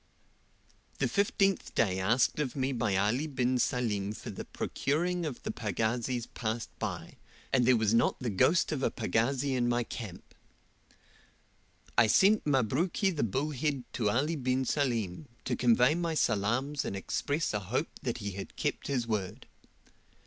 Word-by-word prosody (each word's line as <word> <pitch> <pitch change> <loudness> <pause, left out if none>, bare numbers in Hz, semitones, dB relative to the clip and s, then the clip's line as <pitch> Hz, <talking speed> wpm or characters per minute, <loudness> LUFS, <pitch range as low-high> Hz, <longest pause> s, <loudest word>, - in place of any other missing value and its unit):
The - - +1
fifteenth 195 -1 +1
day 95 -4 +2
asked 115 +10 +2
of 140 -4 -2
me 135 -1 0
by 110 -6 0
Ali 110 +10 +1
bin 130 -3 0
Salim 105 -6 0
for - - -7
the - - -7
procuring 175 +4 -1
of 135 - -7
the - - -2
pagazis 115 +3 -1
passed 110 0 -3
by, - - -5 0.4
and 125 -2 +4
there 130 -2 +6
was 110 -1 +2
not 115 - +3
the 120 -3 -2
ghost 165 - +3
of 150 -4 -2
a - - +2
pagazi 125 +6 0
in 120 -1 +1
my 120 0 +1
camp. 110 -6 -8 1.7
I 115 - +6
sent 195 - +4
Mabruki 145 - +1
the 150 - -1
Bullheaded 140 +3 -1
to 110 -4 +1
Ali 145 +9 +1
bin 130 -1 0
Salim, 120 - -1 0.2
to - - 0
convey 125 +3 +4
my 170 -1 -1
salaams 120 +5 +1
and - - -4
express 145 +10 -1
a 105 - 0
hope 115 - -3
that 120 -3 -2
he 100 -3 -4
had 95 +1 -8
kept - - -2
his 130 -4 0
word. 105 -5 -3
125 Hz, 155 wpm, -30 LUFS, 110-145 Hz, 1.7 s, there